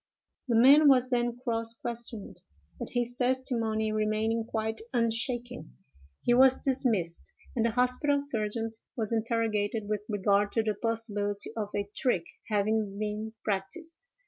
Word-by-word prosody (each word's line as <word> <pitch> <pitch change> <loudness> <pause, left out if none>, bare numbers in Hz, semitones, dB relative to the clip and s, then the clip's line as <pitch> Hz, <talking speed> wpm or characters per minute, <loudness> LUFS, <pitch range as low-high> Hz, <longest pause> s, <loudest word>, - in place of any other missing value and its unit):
"The 235 - +1
man 280 +6 +7
was 255 -2 +4
then 240 -1 0
cross 230 -2 -1
questioned; 235 -2 -7 0.4
but - - -5
his 245 -1 -1
testimony 245 -4 0
remaining 215 +1 0
quite 220 -1 -2
unshaken, 235 - -1 0.5
he 240 - +3
was 260 +1 +6
dismissed, 230 -11 0 0.2
and 230 - +1
the 235 - +3
hospital 250 +4 +2
sergeant 225 -4 -3 0.2
was 225 -1 -1
interrogated 220 -2 0
with 210 -1 -1
regard 205 0 +2
to 225 - +2
the 215 -1 0
possibility 205 -2 -2
of 210 -3 -3
a 200 -1 -1
trick 190 -11 +1 0.2
having 210 -1 0
been 215 +1 -3
practised. 265 - -4
225 Hz, 135 wpm, -29 LUFS, 210-245 Hz, 0.5 s, man